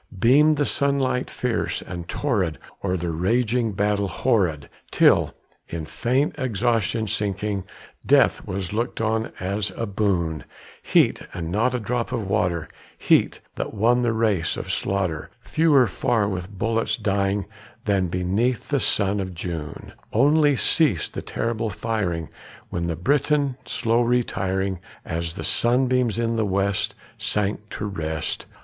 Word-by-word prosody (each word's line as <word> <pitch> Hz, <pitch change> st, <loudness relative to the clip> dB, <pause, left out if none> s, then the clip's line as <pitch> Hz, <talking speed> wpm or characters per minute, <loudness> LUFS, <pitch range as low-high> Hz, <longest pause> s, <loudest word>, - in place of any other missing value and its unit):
Beamed 145 Hz, +8 st, +5 dB
the 145 Hz, -, +2 dB
sunlight 140 Hz, -3 st, +1 dB
fierce 125 Hz, -2 st, -2 dB
and 85 Hz, -2 st, -7 dB
torrid 100 Hz, -, 0 dB, 0.3 s
o'er 95 Hz, -1 st, 0 dB
the 85 Hz, 0 st, -2 dB
raging 115 Hz, +6 st, +1 dB
battle 100 Hz, 0 st, +1 dB
horrid, 95 Hz, -, 0 dB, 0.2 s
Till, -, -, +4 dB, 0.3 s
in 80 Hz, -2 st, -4 dB
faint 130 Hz, -, 0 dB
exhaustion 115 Hz, -, 0 dB
sinking, 100 Hz, -1 st, -2 dB, 0.4 s
death -, -, +4 dB
was 95 Hz, 0 st, -3 dB
looked 115 Hz, +3 st, -2 dB
on 110 Hz, 0 st, 0 dB
as 100 Hz, +3 st, -1 dB
a 115 Hz, -, -1 dB
boon; 95 Hz, -6 st, 0 dB, 0.4 s
Heat, -, -, +3 dB
and 85 Hz, -2 st, -4 dB
not 115 Hz, +6 st, +1 dB
a -, -, 0 dB
drop 120 Hz, +2 st, -2 dB
of 115 Hz, -6 st, -2 dB
water 90 Hz, -5 st, 0 dB, 0.3 s
heat, -, -, +2 dB, 0.2 s
that -, -, -4 dB
won 120 Hz, +4 st, +3 dB
the 120 Hz, -2 st, +2 dB
race 110 Hz, -7 st, +1 dB
of -, -, -4 dB
slaughter, 90 Hz, -6 st, -1 dB
Fewer 150 Hz, -5 st, +4 dB
far 110 Hz, +1 st, 0 dB
with 90 Hz, -2 st, -4 dB
bullets 115 Hz, +3 st, -1 dB
dying 100 Hz, 0 st, 0 dB, 0.4 s
than 100 Hz, -3 st, +2 dB
beneath 95 Hz, +8 st, 0 dB
the 140 Hz, -1 st, +2 dB
sun 100 Hz, -4 st, +1 dB
of 95 Hz, -2 st, -4 dB
June; 85 Hz, -3 st, -6 dB, 0.2 s
Only 145 Hz, +4 st, +4 dB
ceased 130 Hz, -, +2 dB
the -, -, -4 dB
terrible 115 Hz, -1 st, -2 dB
firing, 95 Hz, -6 st, -2 dB, 0.4 s
with 85 Hz, 0 st, -2 dB
the 85 Hz, -, -1 dB
Briton 140 Hz, -, +1 dB
slow 115 Hz, 0 st, +1 dB
retiring, 95 Hz, -6 st, 0 dB, 0.3 s
As 85 Hz, 0 st, -3 dB
the -, -, -6 dB
sunbeams 125 Hz, -1 st, +2 dB
in 115 Hz, 0 st, 0 dB
the 110 Hz, -, +2 dB
west 100 Hz, 0 st, 0 dB, 0.2 s
sank 105 Hz, 0 st, -1 dB
to 105 Hz, -, -5 dB
rest. 80 Hz, -6 st, -3 dB
105 Hz, 140 wpm, -24 LUFS, 95-120 Hz, 0.4 s, Beamed